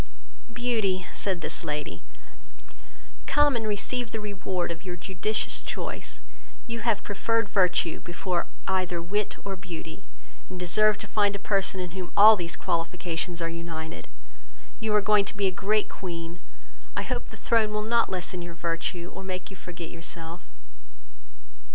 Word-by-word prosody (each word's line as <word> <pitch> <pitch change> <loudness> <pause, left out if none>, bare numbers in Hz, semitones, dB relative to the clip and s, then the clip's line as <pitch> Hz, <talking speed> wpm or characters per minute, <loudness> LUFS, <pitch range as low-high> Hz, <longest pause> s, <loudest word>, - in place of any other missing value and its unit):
"Beauty, 220 -7 +1
(said 190 -4 +1
this - - 0
lady,) 150 0 -3 1.3
come 295 -2 +5
and 225 -2 0
receive 230 +4 -1
the 220 - -2
reward 190 -4 -2
of 165 -1 -6
your 180 -2 -4
judicious 190 +4 -1
choice; - - -3 0.4
you 230 -1 -3
have 225 -2 +1
preferred 230 +2 +1
virtue 180 -4 +3
before 175 0 -2 0.2
either 185 -2 +1
wit 200 +5 0
or 195 -1 -2
beauty, 170 -3 -7 0.5
and 185 - -6
deserve 210 +4 +4
to - - -3
find 205 -1 +2
a 200 - -7
person 195 -1 +2
in 180 -2 -3
whom 185 0 -5
all 215 +2 +11
these 170 -4 -2
qualifications 170 +2 -1
are - - +1
united: 165 -1 -5 0.7
you 220 -1 0
are 210 - +6
going 210 0 +5
to 200 - -5
be 200 - +2
a 190 - +4
great 205 +3 +2
Queen; 170 -2 -5 0.6
I - - +1
hope - - -2
the - - -9
throne 220 -2 +3
will 210 0 0
not 230 +1 +3
lessen 180 -1 -1
your 170 -1 -7
virtue, 170 +1 -2
or - - -7
make 185 0 -4
you - - -8
forget 175 -2 -7
yourself. 165 0 -4
185 Hz, 155 wpm, -28 LUFS, 170-210 Hz, 1.3 s, all